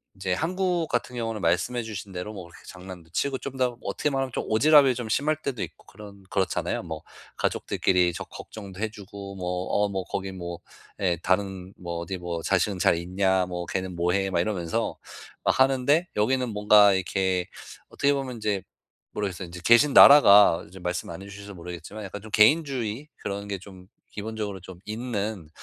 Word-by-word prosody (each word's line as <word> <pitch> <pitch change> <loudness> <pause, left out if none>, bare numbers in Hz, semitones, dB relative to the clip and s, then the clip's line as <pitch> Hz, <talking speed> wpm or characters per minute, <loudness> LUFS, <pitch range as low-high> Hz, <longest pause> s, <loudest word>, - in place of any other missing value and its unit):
이제 95 -1 -2
한국 175 - 0
같은 125 +1 -2
경우는 115 -3 -3
말씀해 105 +9 +1
주신 105 -3 -7
대로 95 +4 -5
뭐 95 - -7
그렇게 85 - -16
장난도 90 -2 -10
치고 135 +8 -1
좀 135 -1 -7
더 125 -2 0
어떻게 150 - -1
말하면 135 -2 -1
좀 - - -4
오지랖이 140 +3 +5
좀 120 -1 -5
심할 150 +7 +1
때도 130 -7 -3
있고 - - -10
그런 100 -2 -13
그렇잖아요. 95 -1 -1
뭐 80 -2 -6 0.4
가족들끼리 90 -1 +1
저 - - -5
걱정도 100 -3 -10
해 110 +1 -1
주고 100 -1 -9
뭐 90 -1 -3 0.2
어 - - 0
뭐 95 -1 -3
거기 95 +1 -4
뭐 85 -2 -6 0.4
예 90 -3 +1
다른 95 0 -1
뭐 85 -1 -5
어디 90 +3 -4
뭐 85 -2 -4
"자식은 95 +1 +1
잘 - - +4
있냐? 95 +2 +1
뭐 90 -1 -4
걔는 95 0 -3
뭐 85 +1 +1
해." 95 0 +1
막 90 - 0
이러면서 90 -4 -2 0.5
아 - - +4
하는데 135 +5 +3
여기는 125 +4 +1
뭔가 105 -1 +6
이렇게 95 -1 0 0.4
어떻게 140 0 +1
보면 135 -3 -3
인제 105 -3 -1 0.5
모르겠어요. 95 -3 -3
인제 90 +1 -9
계신 120 +8 +5
나라가 105 - +8
좀 95 -1 -12
말씀 90 0 -3
안 85 +2 -7
해 - - -10
주셔서 100 0 -10
모르겠지만 90 +4 -8
약간 100 +1 -7
좀 110 - -11
개인주의 130 0 +2
그런 100 +1 -5
게 100 - -3
좀 95 -1 -14 0.2
기본적으로 105 -2 -5
좀 90 0 -11
있는 105 -6 -4
100 Hz, 370 characters per minute, -26 LUFS, 90-115 Hz, 0.5 s, 나라가